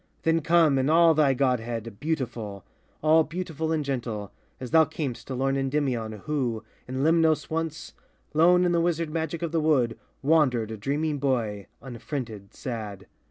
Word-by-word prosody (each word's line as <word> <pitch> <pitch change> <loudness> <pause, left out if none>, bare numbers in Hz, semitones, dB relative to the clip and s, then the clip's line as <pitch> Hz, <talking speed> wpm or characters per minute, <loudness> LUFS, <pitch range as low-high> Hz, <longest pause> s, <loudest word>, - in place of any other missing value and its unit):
Then 165 0 +2
come 160 -4 +4
in 130 +2 +1
all 165 +1 +6
thy 145 -3 +3
godhead, 115 -4 -1
beautiful! 120 - -3 0.4
All 160 +1 +5
beautiful 160 -1 -4
and 155 -2 0
gentle, 115 -7 -3 0.3
as 125 -2 -7
thou 160 -1 +7
cam'st 145 -7 -5
To 130 - -4
lorn 135 +2 0
Endymion, 130 -6 -1
who, 125 -7 -1 0.2
in 130 +1 -2
Lemnos 160 -1 +3
once, 165 0 -3 0.4
Lone 180 +3 +5
in 175 - +2
the 170 -1 +2
wizard 165 -2 0
magic 165 +1 -3
of 165 - -2
the 165 -1 +1
wood, 135 -7 +2 0.2
Wandered, 135 -7 +2
a - - -4
dreaming 145 +6 -1
boy, 115 -7 -1 0.2
unfriended, 115 -4 -6
sad. 105 -6 -6
140 Hz, 160 wpm, -26 LUFS, 120-160 Hz, 0.4 s, thou